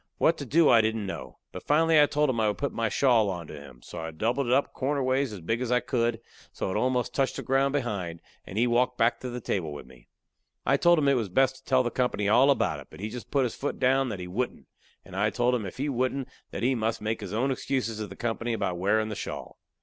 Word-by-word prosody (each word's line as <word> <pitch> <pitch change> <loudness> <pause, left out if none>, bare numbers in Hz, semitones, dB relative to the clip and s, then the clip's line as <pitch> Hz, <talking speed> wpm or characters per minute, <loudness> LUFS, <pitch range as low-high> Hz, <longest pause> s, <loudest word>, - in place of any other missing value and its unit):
What 165 - +3
to 140 - -6
do 160 +6 +4
I 115 -2 +7
didn't 110 -1 -1
know. 95 - -7
But - - -7
finally 160 +1 +4
I 145 - +5
told 150 +1 +1
him 115 - -3
I 110 - +3
would 105 - -1
put 140 - -2
my 115 -1 0
shawl 115 -3 +3
onto 85 -5 -5
him. 70 -5 -12
So 85 - -8
I 80 0 -4
doubled 115 - -1
it - - 0
up 135 +3 +2
corner 140 +1 -1
ways 130 0 +1
as 100 -4 -8
big 115 +8 -1
as 125 -1 -2
I 125 - +4
could, 120 -3 -1 0.3
so - - -3
it - - -3
almost 125 +2 0
touched 135 -1 0
the - - -5
ground 135 +1 +2
behind, 100 -11 -2 0.2
and 95 - -8
he 120 - +4
walked 125 +1 +1
back 115 +1 +2
to 125 - -5
the 125 0 -5
table 90 -8 -2
with 75 - -8
me. 65 -2 -18 0.6
I 135 - +4
told 170 +4 +4
him 145 -2 +2
it 140 - +5
was 115 -6 0
best 130 +7 +2
to 130 - -20
tell 130 -1 +3
the 120 - -2
company 115 -5 0
all 125 +6 +5
about 140 - +2
it, - - -12
but - - -13
he 105 +2 -4
just 125 0 -8
put 140 -2 +2
his 125 - -1
foot 145 - -4
down 135 +1 +2
that 105 -4 -5
he 90 - -6
wouldn't, 120 +8 -3 0.4
and 95 - -11
I 105 +2 +2
told 120 +3 +1
him 110 -5 -1
if - - -9
he 140 +3 -1
wouldn't 130 0 -1 0.2
that - - -5
he 130 +2 +3
must 115 -2 -1
make 110 +1 -2
his 100 -3 -6
own 125 +6 0
excuses 125 -4 -2
to 105 - -3
the 95 - -10
company 120 +1 -2
about 100 -5 -2
wearin' 110 +3 +1
the 105 - -4
shawl. - - -7
120 Hz, 270 wpm, -27 LUFS, 105-135 Hz, 0.6 s, I